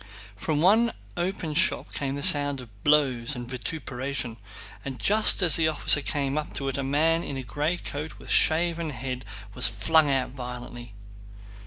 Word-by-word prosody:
From 150 +9 -2
one 220 +6 +3 0.2
open 175 -3 -3
shop 185 +7 0
came 140 -1 -3
the 140 - -5
sound 145 -2 +3
of 110 -5 -13
blows 140 -4 +2
and 120 -1 -7
vituperation, 130 -2 -5 0.5
and 135 -2 -7
just 210 -1 +4
as 170 -4 +7
the 160 -1 +2
officer 150 -1 +5
came 140 0 -2
up 150 - -8
to 135 - -3
it 135 - -3
a - - -2
man 160 +5 +1
in 140 - -6
a 130 - -5
gray 150 +7 -2
coat 150 -1 -7
with - - -14
a - - +1
shaven 165 0 +2
head 130 -3 -6 0.3
was - - +5
flung 145 +10 +2
out 135 -2 -1
violently. 120 -3 -9
140 Hz, 175 wpm, -25 LUFS, 125-160 Hz, 0.5 s, as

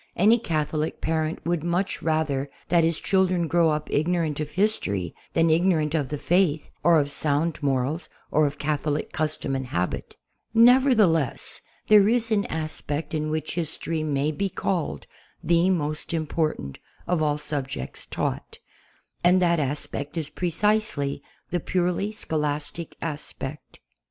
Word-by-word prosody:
Any 220 +6 +5
Catholic 155 -5 -2
parent 160 0 -1
would 170 -2 0
much 175 +3 -1
rather 155 -4 0 0.2
that 170 -1 +4
his 165 0 +2
children 185 -3 +2
grow 170 0 +3
up 150 0 -1
ig 155 +3 +1
norant 165 -5 0
of 150 -1 -3
history 130 - 0 0.2
than 165 -1 +3
ignorant 160 -2 +2
of 145 -5 0
the 150 - -3
Faith 170 -1 +1
or 170 -2 +6
of 145 -1 -1
sound 150 +3 0
morals, 140 +4 -1 0.2
or 155 0 +4
of 145 +1 -5
Catholic 150 0 -1
custom 155 -4 -1
and 130 -1 -3
habit. 90 -7 -3 0.4
Nevertheless, 230 - +4 0.3
there 210 -1 +7
is 235 -1 +2
an 205 -2 +2
aspect 155 -1 -3
in 155 -1 -1
which 155 0 -2
history 165 -1 -2
may 150 -1 0
be 195 +6 -1
called 180 -3 -2 0.4
the 170 +2 +3
most 155 -2 -1
important 155 - -2 0.3
of 175 -2 0
all 150 -1 +1
subjects 135 - -4
taught. - - -3 0.7
And 180 +1 +5
that 170 -2 +3
aspect 145 +1 -3
is 155 -2 -2
pre 180 - -2
cisely 210 -7 +1 0.3
the 175 - +1
purely 180 +4 0
scholastic 150 -4 -3
aspect. 150 -2 -4
160 Hz, 145 wpm, -25 LUFS, 150-175 Hz, 0.7 s, there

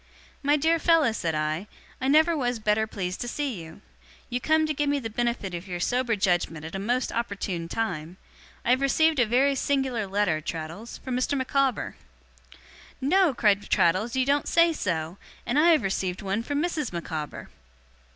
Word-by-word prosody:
'My 290 +1 +3
dear 325 +3 +2
fellow,' 325 -7 +4
said 170 -7 -2
I, 155 +5 -2 0.3
'I 260 - 0
never 315 +4 +5
was 245 -4 -1
better 215 0 +1
pleased 185 -3 -4
to 240 - -3
see 255 - -3
you. 160 0 -12 0.5
You 245 +1 -1
come 315 0 +3
to 310 - -1
give 290 0 0
me 285 - +2
the 225 -5 -5
benefit 235 -4 -2
of 175 +2 -6
your 175 -1 -4
sober 245 +5 +1
judgement 175 -5 0
at 160 - -8
a 195 - -3
most 245 +6 0
opportune 200 -7 -3
time. 180 -6 -3 0.5
I - - +3
have 255 +1 +3
received 315 +2 +3
a 240 - +4
very 265 +5 +3
singular 265 -5 0
letter, 190 -5 0
Traddles, 165 +8 -6
from 260 -2 -4
Mr. 255 +3 0
Micawber.' 265 -1 0 1.0
'No?' 315 +2 +3
cried 205 -3 +2
Traddles. 190 +8 +2
'You 260 -1 +2
don't 285 +1 +1
say 335 0 +4
so? 170 - -3 0.3
And 245 +5 +1
I 335 +3 +6
have 320 -3 +4
received 190 0 -2
one 195 +3 -1
from 285 +4 -2
Mrs. 315 -6 -2
Micawber! 160 -3 -5
235 Hz, 180 wpm, -26 LUFS, 185-280 Hz, 1.0 s, I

